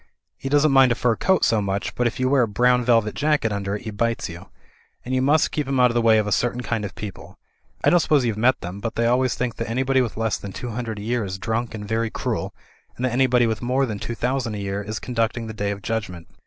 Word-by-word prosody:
He 135 - -6
doesn't 145 +1 +4
mind 135 -2 +6
a - - +2
fur 120 -1 +1
coat 190 +8 +2
so 110 -2 +2
much, 100 0 -2
but 125 - +1
if 120 - -4
you 130 - +2
wear 135 0 +4
a 120 - +2
brown 125 +4 +3
velvet 115 -3 +2
jacket 145 -6 +1
under 100 0 -2
it, 105 - -7
he 110 - -5
bites 115 +1 -1
you. 85 +1 -10 0.6
And 130 - -3
you 130 - +2
must 145 +4 +3
keep 150 -3 -2
him 135 -1 0
out 125 -1 +5
of - - -5
the 120 - +2
way 115 -1 +5
of 105 - +2
a 105 - -3
certain 120 +2 0
kind 115 -3 -2
of 100 - -6
people. 105 -3 -8 0.5
I - - +4
don't 175 - +5
suppose 150 -5 +2
you've 115 -3 0
met 120 +4 +2
them; 90 +3 -6
but 115 +2 -4
they 115 - +1
always 125 +1 +2
think 125 -2 -3
that 115 - -4
anybody 130 +2 +2
with 120 -4 -3
less 110 -1 0
than 100 -1 -8
two 120 +4 -5
hundred 115 -1 -4
a 105 - -6
year 120 +1 -1
is 95 -1 -4
drunk 110 +3 -2
and 105 -1 -7
very 110 +1 0
cruel, - - -3 0.5
and 125 - -1
that 130 - 0
anybody 125 -1 +3
with 110 -1 -1
more 130 +3 +1
than 110 -5 -5
two 120 - -4
thousand 125 -2 -1
a - - -5
year 100 0 -3
is 110 +2 -5
conducting 115 -1 -2
the 110 - -6
Day 105 -1 -2
of 100 -1 -5
Judgment. 105 -7 -4
115 Hz, 275 wpm, -23 LUFS, 105-125 Hz, 0.6 s, mind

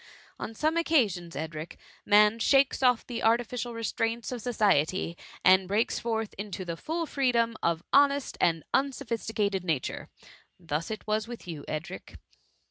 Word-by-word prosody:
On 225 - -6
some 310 +7 +1
occasions, 210 - +1
Edric, 155 +2 -6 0.3
man 210 +2 +5
shakes 275 +3 +3
off 250 -3 +3
the 240 -2 -5
artificial 235 +1 0
restraints 230 +1 -2
of 245 -2 -4
society, 190 -7 +1 0.3
and 185 0 +6
breaks 205 +4 0
forth 225 -2 -2
into 200 -2 -5
the 170 -1 -4
full 330 - -3
free 275 -4 +1
dom 230 -1 +1
of 170 0 0
honest 280 0 +4
and 165 -2 +2
unsophisticated 225 -7 -1
nature: 160 -8 -2 0.3
— - - -34
thus 165 -1 -3
it 215 -1 -6
was 215 +1 -1
with 240 -5 -9
you, 155 -4 -6
Edric. 155 +3 -6
220 Hz, 150 wpm, -28 LUFS, 180-245 Hz, 0.3 s, and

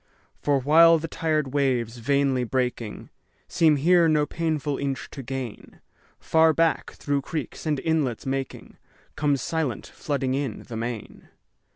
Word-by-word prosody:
For 145 -1 +2
while 165 +5 +6
the 165 +1 -4
tired 155 -4 -1
waves, 125 -4 0
vainly 135 +1 +1
breaking, 125 -3 -3 0.4
Seem 165 -4 +3
here 170 +4 +4
no 150 -2 +3
painful 155 -3 -2
inch 135 -2 -3
to 135 - -7
gain, 130 -3 -7 0.4
Far 160 0 +4
back, 165 +1 +1
through 145 -1 -1
creeks 155 +2 -5
and 150 -3 +1
inlets 150 -8 -1
making, 135 0 -4 0.4
Comes 145 -2 0
silent, 155 -9 -2
flooding 135 -3 -3
in, 135 -5 -3
the 115 - -8
main. 115 -1 -6
140 Hz, 140 wpm, -25 LUFS, 130-155 Hz, 0.4 s, while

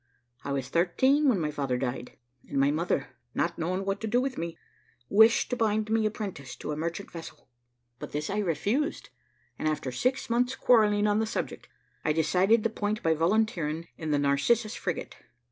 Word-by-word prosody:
I 140 - -4
was 135 -2 -2
thirteen 260 - +3
when 215 -7 +2
my 155 -2 -1
father 135 -4 -1
died, 125 -1 -4 0.3
and 140 - -1
my 140 +1 +4
mother, 165 +4 -1 0.3
not 170 0 -1
knowing 185 +4 -1
what 195 0 -2
to 225 - -2
do 240 +3 +2
with 260 0 -1
me, 170 0 -4 0.5
wished 220 +5 +5
to - - +1
bind 220 -2 0
me 220 -1 +3
apprentice 195 - -6
to - - -5
a - - -2
merchant 170 +5 -4
vessel; 165 -1 -10 0.5
but - - -7
this 150 +1 -2
I 205 - -1
refused, 210 - -1 0.5
and, - - -1
after 150 -4 -1
six 255 - 0
months' 245 +2 +1
quarrelling 210 -5 +4
on 210 0 +2
the 220 - 0
subject, - - -4 0.3
I 150 - +2
decided 185 +8 +3
the 225 - +1
point 215 -1 -2
by 165 - +3
volunteering 165 -2 0
in 160 - -5
the 150 - +2
Narcissus 145 +12 +2
frigate. - - -4
190 Hz, 185 wpm, -28 LUFS, 155-220 Hz, 0.5 s, wished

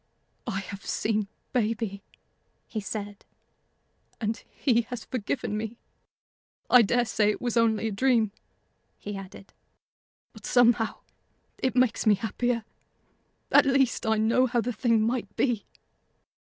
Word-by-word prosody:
"I 195 -4 -2
have 200 +1 -9
seen 215 -2 -1 0.3
baby," 220 -4 -1 0.6
he 220 - -4
said, 205 0 -6 1.0
"and 225 0 -2
he 240 -4 +2
has 245 -3 -6
forgiven 225 -2 -3
me. 220 +2 -4 0.9
I 250 - +9
dare 240 +3 +2
say 210 -2 +2
it 210 - -1
was 240 -1 -2
only 225 -1 +2
a - - -2
dream," 225 -1 +2 0.7
he 205 0 -6
added, 195 0 -10 0.8
"but - - -10
somehow 235 -2 +3 0.6
it 260 -1 0
makes 250 -3 +2
me 210 - +6
happier. 230 +2 -1 0.9
At - - +6
least, 270 -3 +2
I 220 0 +3
know 230 +4 +3
how 240 0 0
the 240 +2 -1
thing 225 -1 +2
might 230 -3 -2
be." 240 -6 0
225 Hz, 130 wpm, -27 LUFS, 210-245 Hz, 1.0 s, I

